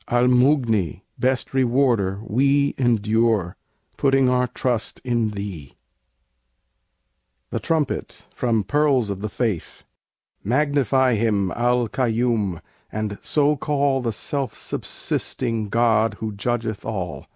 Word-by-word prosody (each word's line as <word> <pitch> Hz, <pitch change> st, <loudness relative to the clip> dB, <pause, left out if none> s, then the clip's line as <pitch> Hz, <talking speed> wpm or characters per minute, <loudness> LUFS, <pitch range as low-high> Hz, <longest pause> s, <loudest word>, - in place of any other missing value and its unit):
Al 120 Hz, 0 st, +2 dB
Mughni! 125 Hz, -, +2 dB, 0.2 s
best 130 Hz, +1 st, 0 dB
Rewarder! 120 Hz, -7 st, +2 dB
we 140 Hz, +5 st, +2 dB
Endure; 110 Hz, -5 st, +2 dB, 0.4 s
putting 135 Hz, -2 st, +3 dB
our 125 Hz, 0 st, +2 dB
trust 120 Hz, -3 st, -2 dB
in 120 Hz, -3 st, 0 dB
Thee. 100 Hz, -9 st, -7 dB, 1.8 s
THE -, -, -1 dB
TRUMPET 160 Hz, -5 st, -2 dB
From 115 Hz, -4 st, 0 dB
'Pearls 135 Hz, -2 st, +2 dB
of 100 Hz, -1 st, -5 dB
the 105 Hz, -, -3 dB
Faith' 110 Hz, -7 st, -3 dB, 0.6 s
Magnify 130 Hz, 0 st, +2 dB
Him, 105 Hz, -4 st, +1 dB
Al 120 Hz, 0 st, +1 dB
Kaiyum; 115 Hz, -6 st, 0 dB, 0.3 s
and 105 Hz, -1 st, -3 dB
so 150 Hz, 0 st, +2 dB
call 140 Hz, -1 st, 0 dB
The 120 Hz, -2 st, -1 dB
"Self 135 Hz, +5 st, -3 dB
subsisting" 110 Hz, -3 st, -3 dB
God 115 Hz, -1 st, +2 dB
who 110 Hz, 0 st, -4 dB
judgeth 110 Hz, +1 st, -3 dB
all. 95 Hz, -5 st, -5 dB
120 Hz, 110 wpm, -22 LUFS, 105-130 Hz, 1.8 s, putting